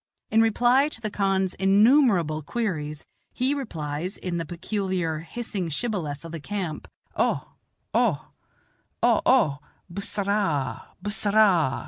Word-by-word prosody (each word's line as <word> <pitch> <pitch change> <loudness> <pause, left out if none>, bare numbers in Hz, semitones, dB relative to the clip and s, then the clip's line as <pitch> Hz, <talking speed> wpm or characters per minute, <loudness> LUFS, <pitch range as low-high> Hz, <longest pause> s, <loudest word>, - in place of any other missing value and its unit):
In 225 - +5
reply 245 +5 +3
to 265 - -6
the 215 -2 -4
khan's 195 -2 +1
innumerable 195 - +4
queries 155 -6 -3 0.3
he 260 +3 0
replies, 170 - -4
in 180 -2 -3
the 165 -2 -4
peculiar, 180 -2 -2
hissing 195 0 -4
shibboleth 160 - -2
of 165 - -8
the 165 - -5
camp, 180 -1 -4 0.3
"O, - - 0 0.4
O, - - +1 0.7
O - - +4
O 140 -1 +3 0.3
bus 195 +3 -5
s - - -4
s - - 0
orah, 150 - 0 0.2
b 205 - -2
s - - -2
s - - -1
s 205 - 0
orah." 180 -11 +4
190 Hz, 150 wpm, -25 LUFS, 160-215 Hz, 0.7 s, In